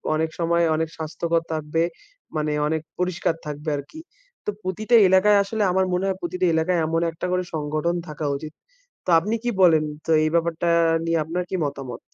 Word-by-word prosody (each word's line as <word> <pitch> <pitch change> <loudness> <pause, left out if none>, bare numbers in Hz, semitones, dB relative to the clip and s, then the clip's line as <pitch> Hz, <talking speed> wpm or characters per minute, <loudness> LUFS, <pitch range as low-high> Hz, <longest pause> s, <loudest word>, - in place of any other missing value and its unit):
অনেক 160 +1 0
সময় 170 0 +2
অনেক 160 0 -1
স্বাস্থ্যকর 165 +1 -1
থাকবে। 155 +1 -1 0.6
মানে 150 0 0 0.2
অনেক 160 +1 -1 0.2
পরিষ্কার 180 -2 0
থাকবে 150 +1 -4
আর 140 - -5
কি। 315 - -10 0.5
তো - - -1
প্রতিটা 215 +6 +1
এলাকায় 195 +2 +5
আসলে 210 +2 -2
আমার 190 +1 +2
মনে 180 +2 0
হয় 190 -1 -1
প্রতিটা 180 +1 -1
এলাকায় 170 +2 +1
এমন 165 +1 0
একটা 165 +2 -6
করে 180 0 +1
সংগঠন 155 +3 -1
থাকা 150 0 -5
উচিত। 155 +2 -8 0.5
তো - - -4
আপনি 210 +7 -2
কি 240 - 0
বলেন? 160 -4 +6 0.2
তো 165 - -1
এই 155 - +2
ব্যাপারটা 170 0 +1 0.4
নিয়ে 165 0 +1
আপনার 175 +3 -2
কি - - -2
মতামত? 135 -4 -5
165 Hz, 185 wpm, -23 LUFS, 155-180 Hz, 0.6 s, বলেন